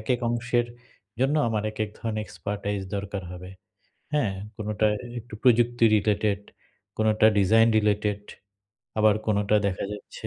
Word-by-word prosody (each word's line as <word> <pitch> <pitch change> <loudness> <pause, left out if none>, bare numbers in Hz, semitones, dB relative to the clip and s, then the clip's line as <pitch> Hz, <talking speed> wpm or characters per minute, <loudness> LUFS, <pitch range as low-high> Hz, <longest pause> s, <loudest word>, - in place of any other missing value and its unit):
একেক 120 +2 -1
অংশের 120 0 0 0.5
জন্য 135 +3 +2
আমার 110 -2 -1
একেক 110 0 -2
ধরনের 110 -2 -3
এক্সপার্টাইজ 100 -1 -4 0.2
দরকার 100 0 -4
হবে। 90 +1 -9 0.6
হ্যাঁ? 130 -10 +1 0.2
কোনোটা 105 0 0 0.3
একটু 120 0 -15
প্রযুক্তি 120 -1 +4
রিলেটেড, 105 -1 +1 0.6
কোনোটা 110 0 +3
ডিজাইন 110 +4 +5
রিলেটেড 105 -1 +1 0.8
আবার 110 -1 +5
কোনটা 105 -1 +2
দেখা 95 -2 -2
যাচ্ছে 105 - -8
105 Hz, 125 wpm, -26 LUFS, 100-115 Hz, 0.8 s, ডিজাইন